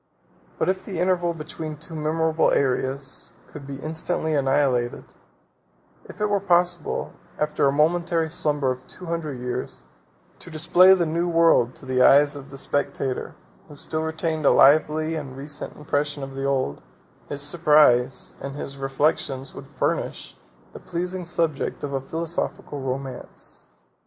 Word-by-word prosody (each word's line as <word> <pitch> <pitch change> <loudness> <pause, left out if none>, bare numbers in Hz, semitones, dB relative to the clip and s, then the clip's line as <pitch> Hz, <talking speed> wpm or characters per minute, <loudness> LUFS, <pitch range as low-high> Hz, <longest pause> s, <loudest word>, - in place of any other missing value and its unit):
But - - 0
if 190 0 0
the 190 -4 -6
interval 175 -1 +1
between 155 0 -6
two 165 +2 -7
memorable 160 +1 +1
eras 135 0 -1 0.2
could 140 -2 -11
be 140 - -5
instantly 160 +1 -2
annihilated; 135 -3 +1 0.9
if - - -12
it 210 - +1
were 205 -1 +1
possible, 175 -3 +1 0.2
after 150 -1 +1
a - - +3
momentary 165 +2 +2
slumber 150 -4 0
of 130 +1 -7
two 185 - -11
hundred 165 -5 -3
years, 125 0 -5 0.6
to - - -10
display 175 +4 +6
the 175 -2 +1
new 170 +2 0
world 165 -7 +4
to - - -11
the 130 -1 +1
eyes 145 +2 +6
of 140 -1 -10
a 135 - -8
spectator, 135 -1 -2 0.3
who 145 - -12
still 155 +2 -3
retained 160 0 -2
a - - +6
lively 155 +2 +4
and 140 -5 -5
recent 145 +1 -6
impression 145 -1 -2
of 135 0 -7
the 135 0 -4
old, 130 - 0 0.5
his 145 0 -1
surprise 145 -5 +4
and 140 0 -5
his 140 -1 -6
reflections 135 -1 -1
would 135 - -10
furnish 135 -2 -2 0.4
the - - -9
pleasing 180 +1 -4
subject 165 -4 -1
of 140 -1 -3
a 135 - -1
philosophical 160 -1 -4
romance. 130 -1 -6
150 Hz, 150 wpm, -24 LUFS, 135-165 Hz, 0.9 s, display